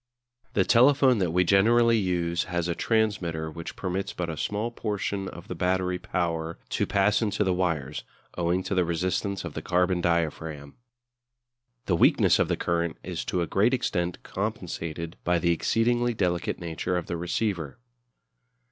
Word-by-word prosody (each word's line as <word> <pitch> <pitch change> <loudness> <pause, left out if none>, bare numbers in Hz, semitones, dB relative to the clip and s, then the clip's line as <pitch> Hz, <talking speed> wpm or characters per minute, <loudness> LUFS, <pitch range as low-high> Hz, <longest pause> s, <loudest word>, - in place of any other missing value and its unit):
The 95 - +3
telephone 130 0 +5
that 90 -3 +1
we 90 +3 +3
generally 115 +5 +4
use 85 -3 0
has 85 -1 -2
a 85 - 0
transmitter 90 -8 0
which 85 +1 -7
permits 95 +1 -3
but 85 -2 -3
a - - -5
small 105 +9 -2
portion 100 -3 -3
of 85 -2 -9
the - - -4
battery 90 +1 0
power 85 -2 -2
to - - 0
pass 100 +2 +2
into 105 -1 +1
the 95 -2 +1
wires, 75 -7 -1 0.3
owing 90 +1 0
to - - -3
the 90 -1 +3
resistance 90 +3 -1
of - - -6
the - - -4
carbon 90 0 +1
diaphragm. 80 -4 -1 1.1
The 90 - +2
weakness - - +4
of - - +3
the - - 0
current 85 -1 -1
is - - -4
to 90 - 0
a - - -1
great 105 +9 +2
extent 90 -7 -2
compensated 85 -5 -4
by 90 0 +2
the 85 0 +2
exceedingly 120 +6 +1
delicate 90 -4 0
nature 85 +2 -2
of 85 - -3
the 85 - -3
receiver. 85 -2 -2
90 Hz, 165 wpm, -27 LUFS, 85-100 Hz, 1.1 s, telephone